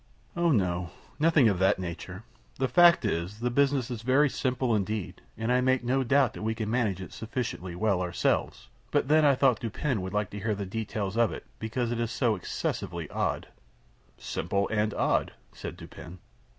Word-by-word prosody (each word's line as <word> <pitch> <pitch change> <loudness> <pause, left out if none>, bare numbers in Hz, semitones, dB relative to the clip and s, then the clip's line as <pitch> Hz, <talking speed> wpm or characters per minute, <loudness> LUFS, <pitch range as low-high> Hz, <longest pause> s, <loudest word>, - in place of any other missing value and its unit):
"Oh 170 0 +2
no, 90 - +1 0.3
nothing 155 -5 +5
of 100 -4 +1
that 95 - +3
nature. 95 +2 -6 0.3
The 130 - +1
fact 175 -3 +6
is, 95 +2 -2
the 120 +1 -1
business 135 -1 +2
is 115 -3 -4
very 135 +4 +3
simple 130 -1 0
indeed, 105 -1 -2 0.2
and 110 +2 -1
I 125 0 +3
make 130 0 +2
no 130 +2 +1
doubt 135 0 +3
that - - -8
we 110 +1 -1
can 110 -1 -3
manage 110 -6 0
it 95 - -8
sufficiently 110 -6 -4
well 100 -1 +1
ourselves; 90 -1 -1 0.2
but - - +1
then 155 +1 +5
I 140 -2 +5
thought 130 -4 +3
Dupin 120 0 -2
would 95 0 -5
like 105 -1 -1
to 105 - -6
hear 105 +1 -1
the 100 0 -4
details 105 0 -3
of 115 -1 +3
it, - - -7
because 115 +2 -2
it 120 - -2
is 115 -1 -1
so 120 -2 +1
excessively 90 - -4
odd." - - -2 0.7
"Simple 100 +4 -1
and 105 0 +1
odd," - - +1 0.2
said - - -7
Dupin. 90 +3 -11
110 Hz, 190 wpm, -28 LUFS, 100-130 Hz, 0.7 s, fact